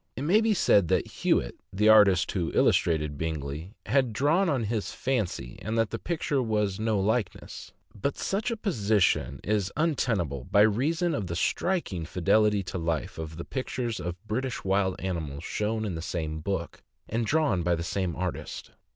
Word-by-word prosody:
It 130 - -4
may 190 +9 +4
be 220 -1 +2
said 100 - +4
that - - +2
Hewitt, - - 0
the 105 +3 +2
artist 105 -5 +6
who 85 -4 -1
illustrated 75 -4 +2
Bingley, 80 +4 -4
had 130 0 +2
drawn 165 - +2
on 135 -6 +1
his 110 -1 -2
fancy, 110 - -2
and 110 +2 -2
that 115 -1 +1
the 115 - -3
picture 160 -4 -1
was 105 -4 0
no 110 -2 +1
likeness; 110 +3 -2 0.2
but 135 +7 -2
such 205 +5 -1
a 230 - -2
position 105 - +1
is 100 -2 0
untenable, 110 - 0
by 100 - +4
reason 155 - +2
of 105 -10 -2
the 85 - -3
striking 100 - -1
fidelity 100 +4 +2
to 95 - -5
life 80 -1 -2
of 80 0 -6
the 85 - -6
pictures 125 -3 -3
of 85 +1 -4
British 125 +4 -2
wild 95 -1 +1
animals 80 -5 -4
shown 110 +3 -2
in 100 - -2
the 80 - -4
same 80 -3 -3
book, 85 0 -4 0.3
and 115 +1 -1
drawn 150 - +2
by 85 0 +2
the 85 - -4
same 90 -1 -2
artist. 90 -1 -5
105 Hz, 175 wpm, -27 LUFS, 85-125 Hz, 0.3 s, artist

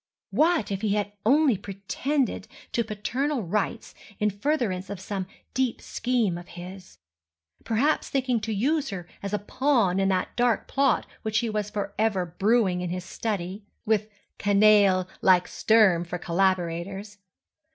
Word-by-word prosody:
What 320 -9 +2
if 195 0 -2
he 210 -2 +1
had 205 -1 -1 0.2
only 280 -1 +5
pretended 220 +8 -2 0.2
to 235 - +1
paternal 240 +5 -2
rights 210 +5 -2 0.2
in 210 0 +1
furtherance 205 -5 -1
of 200 -2 -5
some 190 -1 -4 0.3
deep 260 -2 0
scheme 230 -8 -1
of 175 - -12
his?—perhaps 175 - -4
thinking 255 -3 +1
to 220 +1 -4
use 275 +8 +1
her 180 -3 -6
as 200 - -4
a 210 - +1
pawn 210 -3 +1
in 195 - +2
that 185 -1 -1
dark 240 -2 +1
plot 275 -2 +2 0.2
which 220 -1 -1
he 230 -1 0
was 210 -1 -2
forever 210 -2 -1
brewing 190 +1 +1
in 180 - -3
his 180 0 -4
study 195 -1 -4 0.2
(with 215 -1 +1 0.3
canaille 200 -2 +5
like 180 -1 +5
Sturm 210 -6 +4
for 175 +1 -5
collaborators!) 190 +3 -1
205 Hz, 140 wpm, -26 LUFS, 185-230 Hz, 0.3 s, only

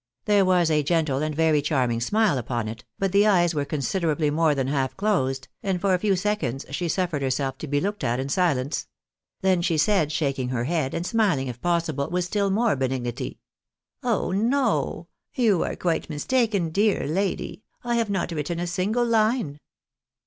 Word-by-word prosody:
There 205 -2 +4
was 180 -3 +3
a 150 -1 +3
gentle 150 -3 +1
and 155 -1 -2
very 160 -1 +3
charming 130 -6 0
smile 205 - +2
upon 120 -2 -3
it, 115 +2 -7
but 195 -1 0
the 200 +2 +4
eyes 175 -4 +3
were 145 -2 -1
considerably 155 +1 0
more 155 -1 +2
than 135 -2 0
half 135 -1 -1
closed, 135 -11 0
and 190 -2 -1
for 195 +1 +2
a 180 - +2
few 200 0 +2
seconds 180 - -2
she 170 +5 -2
suffered 170 -4 -1
herself 135 0 -1
to 155 - -6
be 145 0 +1
looked 205 +5 -3
at 120 +2 0
in 135 - -2
silence; 145 -3 0 0.5
then 190 -2 +2
she 170 -2 +1
said, 160 -2 +2
shaking 140 -4 -1
her 125 -2 -1
head, 150 -1 -1
and 170 - -2
smiling 180 - +1
if 120 -1 -8
possible 165 -5 0
with 180 0 0
still 200 +2 0
more 220 +3 +2
benignity 130 -2 -3 0.2
— - - -66
" - - -45
Oh 205 - 0
no! 235 +8 0 0.3
You 220 - +3
are - - -2
quite 170 -2 -1
mistaken, 200 - 0
dear 205 +4 +2
lady; 190 +6 -2 0.2
I 240 0 -1
have 230 -2 0
not 190 -3 -1
written 165 +1 -3
a 175 - -1
single 195 +7 0
line." 220 - +1
170 Hz, 190 wpm, -25 LUFS, 140-200 Hz, 0.5 s, There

